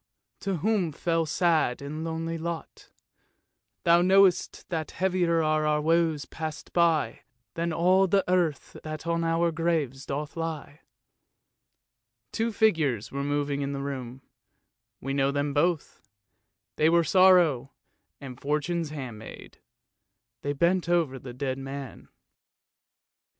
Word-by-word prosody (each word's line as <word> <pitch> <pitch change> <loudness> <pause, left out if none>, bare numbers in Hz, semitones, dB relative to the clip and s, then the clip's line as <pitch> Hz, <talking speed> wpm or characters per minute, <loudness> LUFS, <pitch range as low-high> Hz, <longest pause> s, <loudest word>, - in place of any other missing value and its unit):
to 195 -1 -2
whom 195 -2 0
fell 165 +2 -1
sad 160 -6 +1
and 150 +3 -6
lonely 165 0 -3
lot, 165 0 -6 0.9
Thou 170 0 +5
knowst, 190 0 +3
that 160 -3 -3
heavier 175 -3 +1
are 155 0 +1
our 150 0 +2
woes 160 -1 +1
passed 155 -1 -7
by, 165 -4 +2 0.3
Than 170 0 -2
all 185 +4 +3
the 195 +1 +2
earth 175 -5 0
that 155 +1 -6
on 170 0 0
our 165 +1 +1
graves 155 -5 -1
doth 145 +2 -4
lie." 160 -3 -5 1.5
Two 230 +1 -1
figures 155 - +1
were 140 +1 -3
moving 145 0 -1
about - - -1
in 140 - -3
the 140 - -4
room; 130 -2 -6 0.8
we 135 +1 -3
know 135 0 +2
them 145 0 -1
both. 155 +2 0 0.8
They 155 - +4
were 170 0 +4
Sorrow 175 -7 +4 0.5
and 130 -3 -10
Fortune's 150 +3 -1
handmaid; 125 -7 -9 0.8
they 145 - -2
bent 170 +4 +1
over 160 -7 +1
the 125 - -9
dead 130 +1 -3
man. 135 -1 -8
160 Hz, 130 wpm, -27 LUFS, 140-170 Hz, 1.5 s, Thou